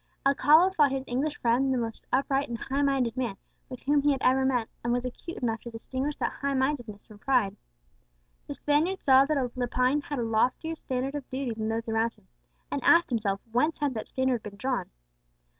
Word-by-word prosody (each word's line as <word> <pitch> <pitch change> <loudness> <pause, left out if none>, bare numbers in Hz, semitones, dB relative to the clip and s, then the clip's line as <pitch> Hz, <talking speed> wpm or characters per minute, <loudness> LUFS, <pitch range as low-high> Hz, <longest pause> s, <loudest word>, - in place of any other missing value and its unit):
Alcala 300 +6 +5
thought 295 -7 +3
his 270 -1 -2
English 285 +5 -2
friend 250 +3 +2
the 260 - +1
most 230 -2 -4
upright 275 +1 +1
and 235 - -3
highminded 270 -2 0
man 240 -7 -2 0.3
with 255 -2 -9
whom 290 +1 +3
he 290 +1 +3
had 270 -2 -1
ever 260 +1 +4
met, 250 -4 +1 0.2
and 235 - 0
was 245 +1 0
acute 295 +7 -7
enough 225 -2 -2
to 235 - -8
distinguish 260 +5 -4
that - - -2
highmindedness 265 -6 -1
from 210 -1 -15
pride. 235 -6 +1 0.9
The - - -5
Spaniard 315 +6 0
saw 265 0 +6
that 305 +1 0 0.2
Lepine 255 +3 +1
had 290 0 -5
a 240 - -1
loftier 250 +8 0
standard 265 -2 -3
of 290 -3 -6
duty 260 -2 -3
than 220 0 -3
those 225 +1 -2
around 225 +1 0
him, - - -27 0.4
and - - -2
asked 340 -4 +5
himself 205 -4 -1
whence 300 +8 +1
had 290 -3 -1
that 220 - -5
standard 260 -3 0
been 205 -2 -9
drawn. 255 +3 -2
260 Hz, 195 wpm, -28 LUFS, 235-280 Hz, 0.9 s, saw